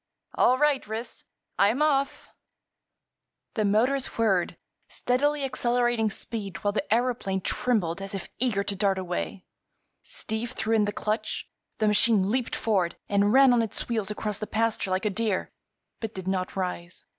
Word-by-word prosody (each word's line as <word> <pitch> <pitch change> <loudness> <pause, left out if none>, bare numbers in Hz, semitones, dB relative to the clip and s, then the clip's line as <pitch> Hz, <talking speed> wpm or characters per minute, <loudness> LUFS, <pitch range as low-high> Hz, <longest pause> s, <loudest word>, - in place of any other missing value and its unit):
All 255 - +4
right, 290 -4 +2
Ris; 220 +3 -6 0.3
I'm 220 +9 +4
off!" 280 -2 0 1.2
The 220 - 0
motors 245 +7 +2
whirred, 195 -6 +1 0.3
steadily 285 +4 0
accelerating 240 -3 +1
speed 200 -3 -4
while 205 - +2
the 215 - -1
aëroplane 225 -5 0
trembled 195 -8 0
as 195 +1 -4
if 195 - -5
eager 220 -5 +1
to 200 - -2
dart 195 -1 +1
away. 185 +1 -4 0.6
Steve 225 +3 -4
threw 225 -2 -1
in 210 -2 +3
the 205 - -1
clutch; 215 +2 -2 0.3
the 215 - +1
machine 210 -2 +4
leaped 250 0 0
forward 190 -6 0
and 205 0 +3
ran 265 +1 +7
on 240 - +4
its 225 - -3
wheels 220 -4 -1
across 210 -1 -3
the 215 - -4
pasture 225 -3 0
like 185 +2 0
a 210 - +2
deer, 215 -1 -1 0.5
but 225 -1 -5
did 190 -1 -6
not 185 -1 -1
rise. 180 -2 -4
215 Hz, 155 wpm, -27 LUFS, 195-240 Hz, 1.2 s, ran